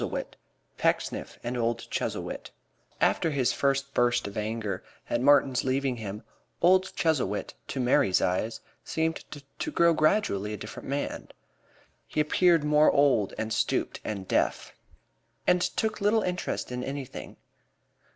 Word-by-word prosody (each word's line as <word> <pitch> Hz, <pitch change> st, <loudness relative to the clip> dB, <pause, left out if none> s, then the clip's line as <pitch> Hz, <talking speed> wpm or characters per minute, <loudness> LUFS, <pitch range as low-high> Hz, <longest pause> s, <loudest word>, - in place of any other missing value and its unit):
II -, -, -2 dB, 0.6 s
PECKSNIFF -, -, -1 dB
AND 120 Hz, +1 st, -3 dB
OLD 115 Hz, 0 st, -1 dB
CHUZZLEWIT -, -, -3 dB, 0.5 s
After 165 Hz, -, +2 dB
his 135 Hz, -5 st, +1 dB
first 140 Hz, 0 st, 0 dB
burst 120 Hz, 0 st, +2 dB
of 100 Hz, -, -8 dB
anger 105 Hz, -3 st, -3 dB, 0.3 s
at 120 Hz, -, +1 dB
Martin's 135 Hz, -2 st, +4 dB
leaving 130 Hz, -1 st, 0 dB
him, 105 Hz, -1 st, -6 dB, 0.4 s
old 185 Hz, +2 st, +4 dB
Chuzzlewit, 135 Hz, -, 0 dB
to 135 Hz, -, -4 dB
Mary's 125 Hz, -5 st, +3 dB
eyes, 100 Hz, +5 st, -1 dB, 0.2 s
seemed 160 Hz, 0 st, -1 dB, 0.4 s
to -, -, -2 dB
grow 170 Hz, -, +4 dB
gradually 155 Hz, -, +1 dB
a -, -, -4 dB
different 105 Hz, -, -8 dB
man. 140 Hz, +1 st, -3 dB, 0.8 s
He -, -, -3 dB
appeared 165 Hz, +1 st, +4 dB
more 150 Hz, 0 st, +5 dB
old 140 Hz, -8 st, +3 dB
and 110 Hz, 0 st, -2 dB
stooped -, -, 0 dB
and 100 Hz, -3 st, -4 dB
deaf, -, -, 0 dB, 0.7 s
and 180 Hz, 0 st, +4 dB
took 215 Hz, +3 st, -1 dB
little 210 Hz, +1 st, +3 dB
interest 180 Hz, -7 st, -3 dB
in 125 Hz, 0 st, -3 dB
anything. 135 Hz, -1 st, -6 dB
135 Hz, 135 wpm, -28 LUFS, 110-160 Hz, 0.8 s, more